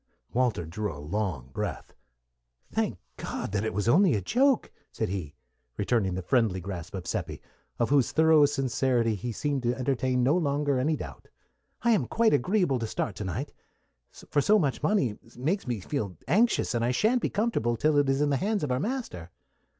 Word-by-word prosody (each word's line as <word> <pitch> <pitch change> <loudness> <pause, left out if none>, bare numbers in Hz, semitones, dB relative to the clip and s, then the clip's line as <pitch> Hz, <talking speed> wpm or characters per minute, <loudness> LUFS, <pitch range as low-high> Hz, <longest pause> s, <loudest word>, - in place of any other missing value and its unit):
Walter 120 -9 +1
drew 105 +6 -3
a 75 - -9
long 75 - -3
breath. - - -4 0.8
"Thank - - -1 0.2
God - - -4
that 100 +1 0
it 110 - -1
was 105 +3 -2
only 175 - +5
a - - +1
joke!" 265 - +2 0.2
said - - -2
he, 90 -7 -5 0.4
returning 100 -3 +1
the 95 - -4
friendly 110 -2 +2
grasp 90 -1 -6
of 90 -3 -5
Seppi, - - -3 0.4
of 120 - 0
whose 140 -1 +3
thorough 155 -1 +5
sincerity 130 -4 +1
he 110 +4 -4
seemed 140 +4 -1
to 120 0 0
entertain 130 -1 0
no 140 +6 +3
longer 145 -4 +1
any 155 +5 +1
doubt. - - -9 0.6
"I 235 - +4
am 220 - +2
quite 230 -1 +2
agreeable 145 - +2
to 115 - -2
start 105 - -3
to 105 - -4
night, 95 -3 -4 0.8
for 145 - +3
so 215 +8 +4
much 145 -9 0
money 130 - +1 0.2
makes 160 +7 -1
me 120 -3 -1
feel 100 - -4
anxious, 210 - +2
and 120 -1 0
I 120 - +2
sha'n't 220 - +2
be - - 0
comfortable 195 - 0
till 150 +5 +2
it 140 -1 +2
is 135 +1 +1
in 145 -1 +2
the 140 - +2
hands 205 +2 -1
of 145 - -1
our 125 - +1
master." 210 - -4
130 Hz, 190 wpm, -28 LUFS, 105-155 Hz, 0.8 s, only